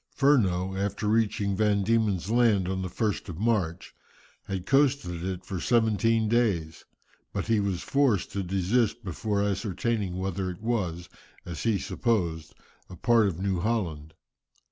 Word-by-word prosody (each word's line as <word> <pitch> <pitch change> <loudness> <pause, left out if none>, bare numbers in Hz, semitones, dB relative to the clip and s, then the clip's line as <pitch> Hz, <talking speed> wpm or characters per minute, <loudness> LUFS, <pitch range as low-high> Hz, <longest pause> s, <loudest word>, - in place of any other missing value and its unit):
Furneaux, 95 -10 +2
after 100 +2 -2
reaching 105 -2 +1
Van 105 -1 +2
Diemen's 105 -3 +1
Land 115 -6 +3
on 95 0 -2
the 95 - -3
1st 105 +2 -2
of 85 - -6
March, 95 -6 -1 0.5
had 95 -2 -4
coasted 135 - +1
it 95 -1 -4
for 95 -1 -4
seventeen 115 0 +2
days, 100 -9 0 0.5
but - - -3
he 115 -1 +2
was 100 -3 -1
forced 135 -9 +1
to 100 - -2
desist 100 +6 0
before 100 +2 -1
ascertaining 100 0 -1
whether 95 0 -2
it 90 - -7
was, 90 -8 -2 0.4
as 85 -3 -6
he 115 -3 +2
supposed, 85 -10 -1 0.3
a 90 - -9
part 115 +4 +3
of 90 -3 -3
New 95 -2 0
Holland. 85 -8 -2
100 Hz, 145 wpm, -27 LUFS, 90-115 Hz, 0.5 s, Land